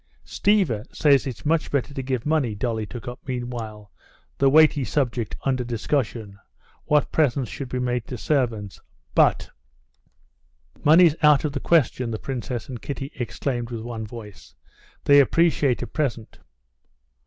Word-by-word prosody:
"Stiva 185 - +1
says 140 -3 +3
it's 125 +1 -7
much 160 +1 +1
better 140 0 -1
to 135 - -4
give 130 -2 -3
money." 150 -8 +1
Dolly 110 -1 -2
took 120 +1 -9
up 125 0 -6
meanwhile 120 -5 -5 0.5
the 135 - +5
weighty 150 -1 +5
subject 120 -5 -1
under 130 -2 0
discussion, 115 -3 -3 0.5
what 150 -1 +2
presents 140 -5 +1
should 135 -3 -6
be 125 - -3
made 125 -2 -2
to 125 - -6
servants. 115 - -1 0.3
"But...." - - +3 1.3
"Money's 160 +1 +6
out 150 -2 +5
of 150 - -1
the 140 - -3
question!" 130 -6 +2
the 110 - -3
princess 120 -2 -5
and 125 -4 -7
Kitty 140 -1 -5
exclaimed 120 0 -3
with 115 -2 -5
one 115 -2 -6
voice. 105 -6 -11 0.5
"They 145 0 +6
appreciate 145 -3 +2
a - - -2
present...." 120 -7 -3
125 Hz, 145 wpm, -24 LUFS, 115-145 Hz, 1.3 s, Money's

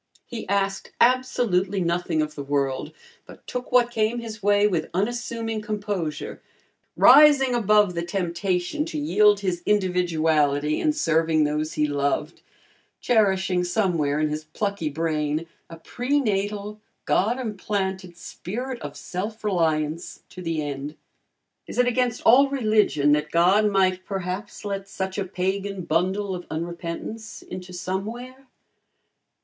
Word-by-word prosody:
He 230 -5 -7
asked 195 0 -1
absolutely 235 -6 +2
nothing 170 -2 0
of 150 0 -5
the 145 - -6
world, 140 +1 -1 0.4
but - - -14
took 250 0 -5
what 245 -1 +4
came 220 +1 0
his 225 -2 -7
way 205 +1 +4
with 175 -7 0
unassuming 225 +1 -2
composure, 205 -7 -4 0.6
rising 285 -4 +7
above 210 -4 +3
the 170 - -2
temptation 180 - -1
to 325 -1 -5
yield 210 -9 +3
his 180 -3 -2
individuality 160 -7 +1
in 310 - +3
serving 165 - +2
those 150 +1 -1
he 150 - +1
loved, 145 +2 -1 0.6
cherishing 190 -6 +2
somewhere 175 -6 0
in 155 0 +1
his 150 +1 -4
plucky 200 +1 -3
brain 155 0 -1 0.2
a 165 - -9
pre 250 - -1
natal, 210 -2 -2 0.2
God 225 +6 +2
implanted 190 -5 -3
spirit 240 +9 -6
of 145 0 -7
self 210 +5 -5
reliance 165 -4 -1
to 180 - -10
the 165 -3 -2
end. 145 +1 -5 0.7
Is - - -8
it 250 - +4
against 245 -1 0
all 270 +4 +6
religion 215 - +2
that 150 +1 +1
God 185 +6 +4
might 185 -2 +2
perhaps 195 +2 -5
let 195 -1 -4
such 190 +1 -4
a 195 - -1
pagan 190 +1 -3
bundle 190 +5 0
of 180 -1 -7
unrepentance 170 +6 -6
into 185 0 -8
Somewhere? 230 +9 -5
190 Hz, 130 wpm, -24 LUFS, 165-215 Hz, 0.7 s, rising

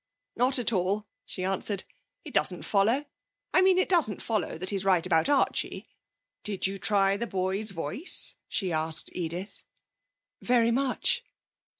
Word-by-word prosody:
'Not 255 +3 +3
at 235 -2 +1
all,' 195 +3 0 0.2
she 185 - -5
answered. 195 +1 -2 0.4
'It - - -9
doesn't - - +3
follow. 225 +8 +2 0.5
I 370 - +5
mean 375 -1 +4
it 370 - +2
doesn't 325 - +2
follow 215 -7 -2
that 185 +4 +1
he's 195 -2 -1
right 185 -3 +2
about 170 - +2
Archie. 285 -2 0 0.5
Did 205 -3 -3
he 195 +1 -1
try 195 0 +2
the 235 +2 -3
boy's 190 +2 0
voice?' 195 - 0
she 185 -5 -2
asked 160 +1 -1
Edith. 180 +3 -5 0.8
'Very 235 -1 +3
much.' 260 +2 0
200 Hz, 145 wpm, -28 LUFS, 185-235 Hz, 0.8 s, I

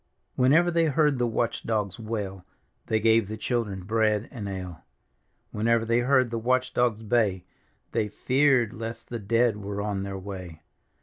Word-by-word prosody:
Whenever 155 +8 +4
they 165 -1 +3
heard 150 -3 +2
the 120 - +2
watch 115 0 -1
dogs 105 -4 -2
wail, 105 -4 -4 0.4
They 110 - +1
gave 110 -1 +3
the 110 +1 -5
children 105 -7 -2
bread 110 +1 +1
and 105 -7 -6
ale. 90 -4 -6 0.7
Whenever 115 +1 +1
they 115 +1 +2
heard 130 -1 +3
the 115 - -2
watch 130 +2 +1
dogs 115 -3 +1
bay, 105 -5 +1 0.5
Thy 105 - 0
feared 130 +1 +2
lest 115 0 -7
the 120 - -4
dead 115 +1 +2
were 100 0 -5
on 100 -1 -2
their 100 0 -4
way. 90 -5 -8
115 Hz, 165 wpm, -26 LUFS, 100-120 Hz, 0.7 s, Whenever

